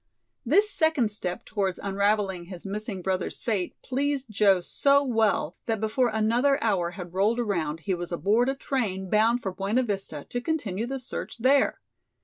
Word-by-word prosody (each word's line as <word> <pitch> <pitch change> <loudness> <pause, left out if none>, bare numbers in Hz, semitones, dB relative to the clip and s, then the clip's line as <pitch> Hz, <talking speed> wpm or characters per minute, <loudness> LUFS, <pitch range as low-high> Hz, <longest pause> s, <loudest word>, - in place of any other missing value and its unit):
This 360 - +4
second 315 - +1
step 180 -3 -5
towards 195 -4 -1
unravelling 200 -2 0
his 180 0 -9
missing 200 -1 -4
brother's 185 -1 -2
fate 205 -6 -1
pleased 275 -2 -1
Joe 200 -2 +4
so 280 +10 +3
well 220 - +1
that 225 -2 0
before 225 +4 +1
another 235 +6 +2
hour 190 -6 +1
had 175 -2 -7
rolled 205 +5 +2
around 165 -9 -1
he 190 +2 -1
was 175 0 -4
aboard 215 +8 +2
a 270 - -1
train 200 -9 -2
bound 225 +3 +3
for 190 - -2
Buena 200 +7 0
Vista 195 - -4
to 245 - -3
continue 235 - -2
the 270 +1 -3
search 250 - -6
there. 265 +4 +3
215 Hz, 165 wpm, -26 LUFS, 190-245 Hz, -, This